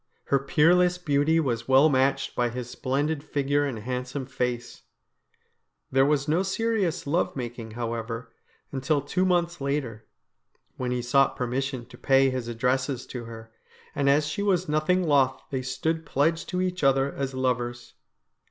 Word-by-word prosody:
Her 140 - +2
peerless 175 +6 +3
beauty 160 -1 +2
was 120 -6 -1
well 135 +3 +6
matched 135 -1 +1
by 120 -1 +1
his 120 0 -5
splendid 140 +4 -2
figure 145 -1 0
and 135 -5 -3
handsome 125 +4 -4
face 125 -2 -3 1.1
There 135 +1 +4
was 145 -1 +1
no 160 +4 +2
serious 195 -3 -1
love 165 +5 0
making, 120 -3 -5
however, 115 0 -4 0.4
until 140 +2 0
two 180 +7 0
months 175 -3 +1
later, 135 -6 -3 0.7
when 125 -1 -3
he 125 -1 -1
sought 135 +3 +3
permission 130 0 -2
to 120 0 -15
pay 135 0 +4
his 130 -2 -3
addresses 130 +3 -1
to 120 -2 -5
her, 115 -1 -10 0.4
and 140 -2 +1
as 145 +2 +4
she 150 +7 -3
was 185 -3 +1
nothing 155 +5 +2
loth 140 -5 +3
they 130 -2 -1
stood 160 +6 -2
pledged 160 +2 0
to 180 - -1
each 180 -2 -2
other 135 0 +3
as 135 -1 -3
lovers. 120 -2 -2
135 Hz, 155 wpm, -26 LUFS, 125-155 Hz, 1.1 s, well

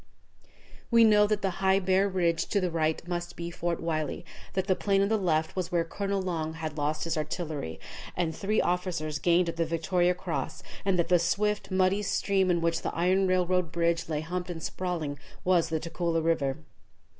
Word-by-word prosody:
We 230 -1 +6
knew 210 -1 +6
that 210 -1 -1
the 195 - +1
high 190 0 +4
bare 190 +1 +2
ridge 170 -3 +1
to 205 - +1
the 180 -2 -1
right 160 0 0
must 175 -1 -4
be 170 0 -5
Fort 170 0 -2
Wylie, 155 -3 -2 0.3
that 190 -1 0
the 190 -1 +2
plain 195 0 +2
on 200 - +1
the 220 - +3
left 160 -6 0
was 185 -1 -2
where 170 -1 +2
Colonel 200 +4 -2
Long 160 -3 -2
had 160 -2 -5
lost 150 0 -1
his 165 0 -1
artillery, 155 - -4 0.4
and 165 -3 0
three 210 +4 0
officers 170 -4 -1
gained 170 +2 +3
the 165 0 -1
Victoria 175 +2 +1
Cross, 180 -2 -4 0.2
and 195 -2 +2
that 170 -1 +1
the 180 -1 +5
swift, 210 +5 0
muddy 185 +1 +2
stream, 195 -2 +1
in 175 -1 +2
which 165 0 0
the - - -3
iron 185 +3 +2
railroad 180 -2 +1
bridge 170 0 0
lay 150 -1 -1
humped 180 +3 -4
and 165 -2 -5
sprawling, 165 -6 -3 0.2
was 180 -2 +3
the 160 -1 0
Tugela 165 +1 -1
River. 145 -5 +1
175 Hz, 190 wpm, -28 LUFS, 165-190 Hz, 0.4 s, We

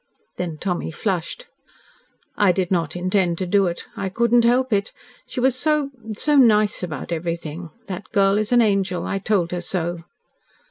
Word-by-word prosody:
Then 170 -3 -4
Tommy 180 +1 -2
flushed. 180 - -3 0.9
"I 200 -3 +4
did 180 0 -1
not 165 -3 0
intend 180 -1 +1
to 185 - -2
do 195 +1 +3
it. 170 0 -4
I 195 - -3
could 235 +5 0
not 240 -1 +6
help 250 0 +2
it. 200 +1 0 0.4
She - - -5
was 255 0 +2
so 295 0 0 0.2
so 295 +7 +1
nice 215 -5 +4
about 170 -3 -5
everything. 170 0 -4 0.2
That 185 -2 -7
girl 200 -1 +3
is 215 +1 -2
an 240 -1 +5
angel. 195 -4 0
I 195 - -2
told 195 -4 0
her 180 -1 -2
so." 175 -1 -2
195 Hz, 175 wpm, -22 LUFS, 175-220 Hz, 0.9 s, not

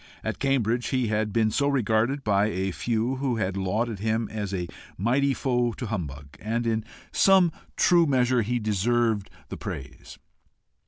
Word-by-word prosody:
At - - -3
Cambridge 125 -3 +1
he 130 -4 0
had 105 0 0
been 110 0 +2
so 140 +5 +1
regarded 130 0 +1
by 100 0 +2
a 95 -2 -1
few 120 +6 -1
who 130 -2 0
had 95 -4 -1
lauded 105 +3 -1
him 110 +1 0
as 105 -2 -3
a 90 -3 -2 0.3
mighty 130 +8 +2
foe 125 -3 0
to 125 - -6
humbug 70 - -5
and 115 +2 -2
in 110 -1 0 0.3
some 190 -3 +5 0.3
true 170 -2 +5
measure 125 -2 +3
he 120 +3 -1
deserved 110 0 +1 0.2
the - - -6
praise. 70 0 -8
115 Hz, 160 wpm, -26 LUFS, 105-125 Hz, 0.3 s, some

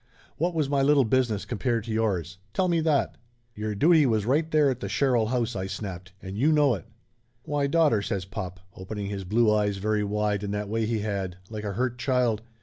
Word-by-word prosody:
What 170 +3 0
was 155 -3 +1
my 140 -1 +1
little 140 -1 +4
business 115 -3 +1
compared 120 -1 -1
to 115 - -6
yours? 95 -6 -1 0.2
Tell 185 - +2
me 170 -2 +2
that 155 -3 +1 0.2
!" 120 -1 -42
"Your 105 0 -3
duty 155 - +5
was 110 -3 +1
right 150 +6 +1
there 150 -3 +4
at 125 - -4
the - - -5
Sherrill 125 -5 +2
house!" 120 -1 -1
I 95 0 -3
snapped. 95 -2 -6
"And 95 +1 -6
you 140 +9 +3
know 145 -4 +4
it." 95 -6 -5 0.6
"Why, 145 -1 0
daughter!" 150 -8 +3
says 100 -2 -3
pop, 95 -2 -6
opening 100 +2 -5
his 100 -2 -5
blue 110 +3 +3
eyes 105 -2 +1
very 105 +1 0
wide 105 0 0
in 100 - -3
that 105 0 -3
way 110 0 0
he 110 -2 -1
had, 100 -4 -3
like 110 -1 -5
a 100 - -2
hurt 125 +3 -2
child. 125 -4 +1
110 Hz, 220 wpm, -26 LUFS, 100-135 Hz, 0.6 s, duty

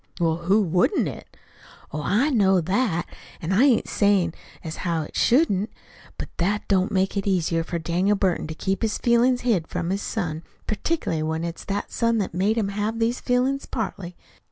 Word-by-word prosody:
"Well, 165 -2 +2
who 190 +5 +2
wouldn't 180 - +2
it?" - - -9 0.6
"Oh, 150 - -2
I 240 - +2
know 195 -6 +4
that; 185 0 0 0.3
an' 165 - -3
I 215 +8 +5
ain't 255 -5 +3
sayin' 195 -5 +2 0.3
as 160 -1 -6
how 165 -3 -1
it - - -11
shouldn't. 230 - +3 0.5
But - - -5
that 200 +4 0
don't 195 +1 +2
make 190 0 +1
it 200 0 -2
no - - +3
easier 165 -2 +1
for 170 +1 -3
Daniel 175 +5 +1
Burton 190 -5 0
to 160 - -6
keep 190 +3 -2
his 220 -2 0
feelin's 245 +1 +3
hid 205 -10 +1
from 170 - -3
his 200 +1 -1
son, 165 -8 -3 0.2
particularly 215 - -1
when 160 +1 -2
it's 170 -1 -5
that 200 +1 -3
son 230 -1 +1
that's 200 -5 -2
made 200 +6 +1
him 210 -3 +1
have 210 +3 -2
the 230 0 +2
feelin's, 255 +2 0
partly. 190 -5 -4
195 Hz, 190 wpm, -24 LUFS, 170-225 Hz, 0.6 s, I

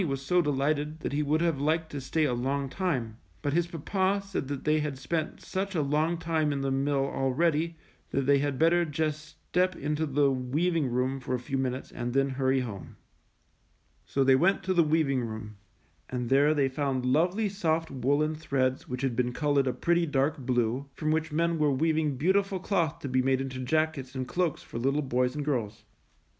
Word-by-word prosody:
was 135 -1 -2
so 180 +6 +3
delighted 150 +1 -1
that - - -3
he 145 - +1
would 150 +2 +1
have 165 -5 +1
liked 160 +2 0
to 140 - -4
stay 155 +4 0
a 140 -5 +1
long 135 +3 -1
time, 130 - -2 0.2
but 145 - 0
his 170 +1 +2
papa 190 +4 0
said 195 -8 -3
they 150 +2 0
had 150 -3 -3
spent 155 +4 -3
such 195 0 -3
a 160 - +2
long 155 +4 +1
time 165 -3 0
in 140 -1 -2
the 135 0 -1
mill 135 0 +1
already 155 +5 0 0.3
that 135 - 0
they 140 +1 +4
had 140 -1 -1
better 170 +3 +4
just 155 -1 -2 0.3
step 185 0 +2
into 150 +2 -1
the 140 0 +3
weav 140 +7 0
ing 155 -5 +1
room 125 +2 -1
for 130 0 -2
a - - -3
few 135 +3 -5
minutes 130 0 -2
and 120 0 -4
then 135 0 +3
hurry 130 0 +1
home. 105 -7 -7 1.1
So 135 - 0
they 135 0 +5
went 180 +8 +2
to 185 - 0
the 175 - +5
weaving 150 -4 +2
room, 110 -2 -6 0.5
and 125 -2 -3
there 145 +3 +4
they 140 -2 +3
found 135 -1 -1
lovely 175 +11 +2
soft 165 -5 -1
woolen 145 +4 +1
threads 135 -4 -1
which 125 +1 -4
had 130 -3 0
been 125 0 +1
colored 145 -1 +1
a - - +2
pretty, 170 0 +1
dark 145 +1 +1
blue, 125 +1 0
from 155 -1 -1
which 155 0 0
men 165 +1 +1
were 150 -1 +3
weaving 155 0 +1
beautiful 190 +5 +1
cloth 170 -5 0
to - - -4
be 130 0 +2
made 130 0 +2
into 135 -1 -4
jackets 140 -1 -1
and 130 -1 -3
cloaks 175 +2 -1
for 115 - -6
little 135 +4 +1
boys 125 0 0
and 145 -1 -3
girls. 115 -8 -2
145 Hz, 200 wpm, -28 LUFS, 130-160 Hz, 1.1 s, they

